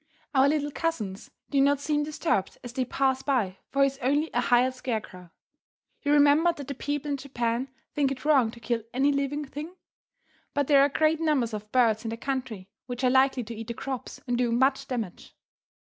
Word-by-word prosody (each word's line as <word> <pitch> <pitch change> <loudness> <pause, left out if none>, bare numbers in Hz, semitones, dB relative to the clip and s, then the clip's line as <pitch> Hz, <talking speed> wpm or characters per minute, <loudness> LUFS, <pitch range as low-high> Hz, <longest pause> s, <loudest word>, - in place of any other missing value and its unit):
Our 270 0 +5
little 295 -1 0
cousins 225 -12 -3 0.2
do 280 -2 +3
not 280 0 +3
seem 295 0 0
disturbed 300 - -1
as 245 -1 -8
they 255 0 -1
pass 265 +1 +1
by, 225 -10 0
for 275 +1 +3
he - - +7
is 275 0 -3
only 285 +5 +1
a 245 - +2
hired 245 +1 +3
scarecrow. 220 -8 -5 0.7
You 285 - 0
remember 295 +3 +5
that 285 -5 -9
the 280 - -3
people 290 +2 -3
in 280 - 0
Japan 250 -1 -2 0.2
think 280 -2 +1
it 270 +1 -6
wrong 275 -7 +4
to 235 - -11
kill 235 0 -1
any 275 +2 +3
living 280 +1 -1
thing. 300 +6 -8 0.8
But 285 0 +2
there 280 0 +5
are 280 - +5
great 310 +2 +2
numbers 285 -8 +1
of 210 0 -6
birds 230 -3 +3
in 225 - -3
the 230 - -4
country 250 -7 -4 0.2
which 245 +1 -5
are 250 - +4
likely 265 -1 +3
to 230 +1 -7
eat 225 0 -7
the 235 - -4
crops 265 +1 -5
and 245 -2 0
do 245 -2 +1
much 265 +3 +2
damage. 225 -8 -5
265 Hz, 205 wpm, -27 LUFS, 235-285 Hz, 0.8 s, he